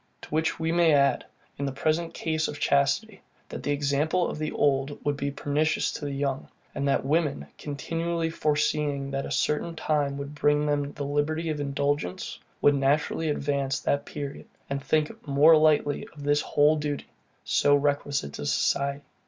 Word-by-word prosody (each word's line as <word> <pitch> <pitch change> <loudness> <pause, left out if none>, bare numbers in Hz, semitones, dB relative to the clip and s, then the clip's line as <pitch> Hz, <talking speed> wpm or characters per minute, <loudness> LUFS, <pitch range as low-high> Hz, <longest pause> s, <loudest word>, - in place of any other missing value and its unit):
To - - -10
which 160 +1 0
we 160 0 0
may 170 -3 +4
add, 140 -1 +3 0.3
in 140 - -1
the 135 - -1
present 155 +4 -1
case 160 -1 -1
of 145 - -6
chastity, 170 +10 +1 0.3
that - - -6
the - - -4
example 145 +5 +1
of - - -5
the 155 0 -2
old 140 0 +1
would 145 0 +1
be 140 0 -2
pernicious 145 +2 0
to 145 - -6
the 145 - -3
young; 140 -1 -2 0.3
and 140 0 -2
that 135 - +1
women, 150 0 0
continually 165 +3 -2
foreseeing 145 -2 0
that 135 0 -2
a - - -8
certain 150 +4 0
time 145 -3 0
would 140 +1 -6
bring 145 0 +2
them 145 -1 -1
the 145 - -5
liberty 150 +3 -1
of 150 - -3
indulgence, 140 -7 -2 0.2
would 145 - +5
naturally 145 +3 +1
advance 140 -2 -1
that 140 - 0
period, 145 0 -6 0.2
and 140 0 -2
think 155 0 -1
more 145 +4 +6
lightly 155 +4 +2
of 145 - -10
this 145 +1 +2
whole 150 +2 +3
duty, 150 -1 -3 0.4
so 145 0 +3
requisite 145 - 0
to 75 - -6
society. 140 - 0
145 Hz, 175 wpm, -27 LUFS, 140-155 Hz, 0.4 s, more